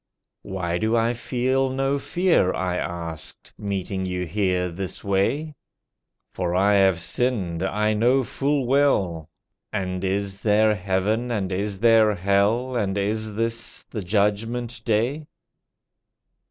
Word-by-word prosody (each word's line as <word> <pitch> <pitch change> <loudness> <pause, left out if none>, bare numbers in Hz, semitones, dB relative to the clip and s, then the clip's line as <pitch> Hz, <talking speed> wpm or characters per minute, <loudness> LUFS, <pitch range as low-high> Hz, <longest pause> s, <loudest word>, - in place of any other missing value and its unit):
"Why 90 -2 -3
do 110 +2 +1
I 115 +1 +2
feel 130 +2 0
no 135 +2 0
fear," 175 - +2
I 90 -1 -1
asked, 85 -3 -5
"Meeting 95 -2 -3
You 90 0 -2
here 90 0 0
this 95 +2 -5
way? 120 +11 0 0.8
For 90 -1 -2
I 100 +3 +4
have 95 -3 +4
sinned 90 -2 -1
I 105 +3 +1
know 125 +5 +3
full 140 +2 -1
well? 100 - +1 0.4
And 90 -3 -3
is 100 +1 -2
there 110 0 +4
heaven, 100 +5 -1
and 100 -5 -2
is 100 +1 -2
there 110 -2 +5
hell, 100 +7 +1
And 100 -4 0
is 105 +1 -1
this 115 +1 -2
the 110 - -3
judgment 110 +5 -1
day?" 125 +7 0
105 Hz, 125 wpm, -24 LUFS, 95-120 Hz, 0.8 s, there